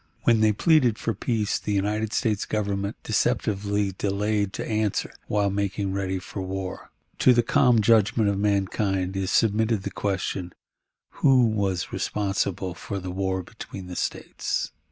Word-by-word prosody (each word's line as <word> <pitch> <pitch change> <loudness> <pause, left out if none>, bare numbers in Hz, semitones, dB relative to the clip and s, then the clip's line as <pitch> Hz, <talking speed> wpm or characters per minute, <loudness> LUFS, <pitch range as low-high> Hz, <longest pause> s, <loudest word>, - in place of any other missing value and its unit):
When 115 -2 +4
they 110 -1 +5
pleaded 125 0 +3
for 115 - -2
peace, 110 -4 -1
the 105 - -3
United 105 +2 0
States 110 -4 0
Government 100 -1 -2
deceptively 100 -1 0
delayed 100 +1 0
to - - -4
answer, 110 -2 -1
while 100 -1 +1
making 100 0 -1
ready 95 -1 -1
for 95 +1 -6
war. 95 0 -5 0.3
To 130 - +6
the 120 - +4
calm 125 -3 +4
judgment 110 0 +4
of 100 -1 0
mankind 95 -2 0
is 95 -1 -1
submitted 110 -1 +2
the - - -4
question, 95 -2 -2 0.7
Who 130 -3 +6
was 100 -5 -1
responsible 100 -3 -1
for 100 +3 -6
the 90 -1 -5
war 95 0 -1
between 95 -1 -9
the 90 0 -7
States? - - -2
100 Hz, 150 wpm, -25 LUFS, 95-110 Hz, 0.7 s, To